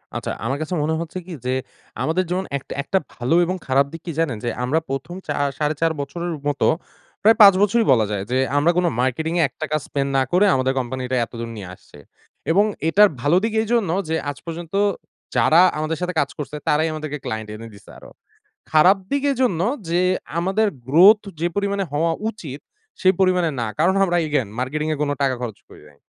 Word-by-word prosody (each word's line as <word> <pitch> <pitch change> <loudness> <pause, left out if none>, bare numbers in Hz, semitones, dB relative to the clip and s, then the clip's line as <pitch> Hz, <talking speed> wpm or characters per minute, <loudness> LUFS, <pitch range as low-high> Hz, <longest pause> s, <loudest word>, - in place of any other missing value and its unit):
আচ্ছা, - - -3
আমার 135 +4 -1
কাছে 155 +3 -4
মনে 160 +2 0
হচ্ছে 170 +2 -6
কি 180 - -8
যে, 130 - 0 0.5
আমাদের 165 +4 +1
যেমন 185 +2 -1
একটা 135 - -9
একটা 190 +5 +1
ভালো 125 +7 0
এবং 185 +2 -2
খারাপ 135 +1 +3
দিক 165 - -8
কি 170 - -3
জানেন? 140 -9 0
যে 120 - -1
আমরা 140 +6 +1
প্রথম 135 +6 -4
চা - - -1 0.2
৪.৫ 155 +2 0
বছরের 170 +5 -4
মতো 145 -1 +1 0.5
প্রায় 220 +2 +5
৫ 200 -2 +10
বছরই 220 +3 +3
বলা 115 -4 +4
যায় 100 -2 -2
যে 130 - +2 0.2
আমরা 155 +4 +4
কোন 180 - +2 0.2
মার্কেটিংয়ে 160 +7 0
১ - - -24
টাকা 155 - -1
spend 140 -1 -2
না 135 - +3
করে 185 +4 +4
আমাদের 130 0 +1
কোম্পানিটা 130 0 -3
এতদূর 115 0 -7
নিয়ে 95 -3 -7
আসছি 75 - -18 0.5
এবং 200 +5 +4 0.2
এটার 205 +3 +6
ভালো 150 +6 +3
দিক 225 0 -1
এইজন্য 225 -4 0 0.2
যে 160 - +1
আজ 145 - -6
পর্যন্ত 165 0 -7 0.6
যারা 165 +3 +5 0.2
আমাদের 155 +1 -2
সাথে 180 0 -2
কাজ 140 - +1
করছে, 150 0 -6
তারাই 155 +2 +2
আমাদেরকে 155 -1 -5
ক্লায়েন্ট 110 -1 -4
এনে 115 +1 -9
দিছে 100 - -16
আরো। - - -14 0.6
খারাপ 180 +6 +6
দিক 280 -1 0
এজন্য 245 -10 0 0.3
যে 175 +1 +1 0.4
আমাদের 195 +5 +1 0.2
growth 195 +9 +6 0.2
যে 170 - +1
পরিমাণে 200 -1 0
হওয়া 160 +3 +1 0.2
উচিত, 150 - -7 0.4
সে 185 - +3
পরিমাণে 180 -3 +3
না। 115 - -1
কারণ 175 +5 +3
আমরা 175 -2 0
again 145 -7 0
মার্কেটিংয়ে 150 +4 -1
কোন 145 - 0
টাকা 135 -2 +2
খরচ 110 -5 -5
করি - - -15
নাই। 70 - -22
160 Hz, 195 wpm, -21 LUFS, 135-180 Hz, 0.6 s, ৫